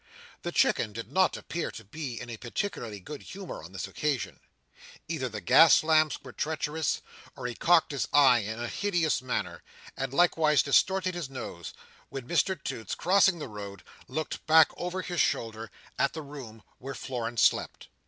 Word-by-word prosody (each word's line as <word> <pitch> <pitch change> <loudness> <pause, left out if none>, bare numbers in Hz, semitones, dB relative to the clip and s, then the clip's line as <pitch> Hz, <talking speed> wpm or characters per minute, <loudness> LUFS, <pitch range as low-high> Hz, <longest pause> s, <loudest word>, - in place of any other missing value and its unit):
The - - -4
Chicken 105 - +2
did 115 +2 -7
not 185 0 +3
appear 170 -1 -4
to 110 - -10
be 125 +3 -6
in 120 - -7
a 115 - -6
particularly 120 - -4
good 145 +10 -8
humour 195 -1 -8
on 85 - -11
this 95 0 -5
occasion. 135 +6 -2 0.7
Either 155 -6 -2
the 105 -2 -6
gas 160 - +7
lamps 155 -1 +3
were 130 -3 -10
treacherous, 155 0 -1 0.3
or 130 - -8
he 125 - -2
cocked 165 +6 +3
his 135 -7 -2
eye 135 -4 +6
in 110 +2 -4
a 120 - -3
hideous 175 -3 0
manner, 90 -9 -3 0.3
and 135 -1 -3
likewise 155 -1 +4
distorted 185 +6 +2
his 175 -6 -5
nose, 90 - -7 0.4
when 135 -3 -7
Mr 185 +4 +1
Toots, 110 -4 -4
crossing 190 0 +4
the 150 - -6
road, 100 -4 -8 0.2
looked 155 +4 -4
back 160 0 +7
over 180 +1 -4
his 175 -3 0
shoulder 110 -1 -1 0.3
at 140 - +2
the 160 - -6
room 130 -7 -10 0.2
where 135 +1 -6
Florence 120 -3 -2
slept. - - +1
140 Hz, 175 wpm, -28 LUFS, 115-160 Hz, 0.7 s, gas